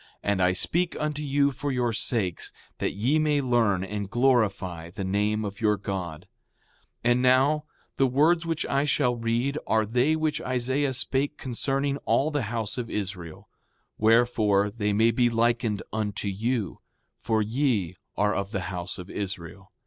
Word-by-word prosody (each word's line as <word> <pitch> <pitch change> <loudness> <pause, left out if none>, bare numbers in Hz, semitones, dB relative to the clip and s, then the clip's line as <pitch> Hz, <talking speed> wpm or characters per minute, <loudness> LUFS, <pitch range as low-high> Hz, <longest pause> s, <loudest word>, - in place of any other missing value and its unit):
And 100 -2 +1
I 90 0 +4
speak 170 - 0
unto 150 -1 -2
you 140 -1 +2
for 140 +2 -3
your 120 -3 0
sakes, 105 -6 -1 0.3
that - - -1
ye 125 +10 +1
may 150 -1 +2
learn 115 -8 +2
and 100 0 -4
glorify 100 -9 +1
the 95 +3 -6
name 105 +3 0
of 100 +3 -6
your 105 -2 +3
God. 95 -5 -5 0.8
6:5 120 - +5
And 125 +1 +3
now, 135 +4 +3 0.3
the 135 - +4
words 155 +6 +3
which 165 -2 -2
I 140 +1 +1
shall 140 -4 +1
read 120 +5 -1
are 110 0 +2
they 125 +8 +2
which 155 -1 -1
Isaiah 130 +2 0
spake 140 +4 0
concerning 135 +2 -1
all 145 +2 +1
the 145 -2 0
house 115 0 -3
of 120 -1 -4
Israel; 90 -5 -5 0.5
wherefore, 110 -3 +3
they 105 -1 -1
may 110 +3 +4
be 120 +1 +2
likened 115 -2 +1
unto 105 -1 -2
you, 110 0 -2 0.4
for 110 -1 +1
ye 110 - 0 0.2
are 105 0 +2
of 100 0 -2
the 95 -3 -3
house 90 +1 -4
of 90 -1 -8
Israel. 95 -1 -6
115 Hz, 165 wpm, -26 LUFS, 100-135 Hz, 0.8 s, 6:5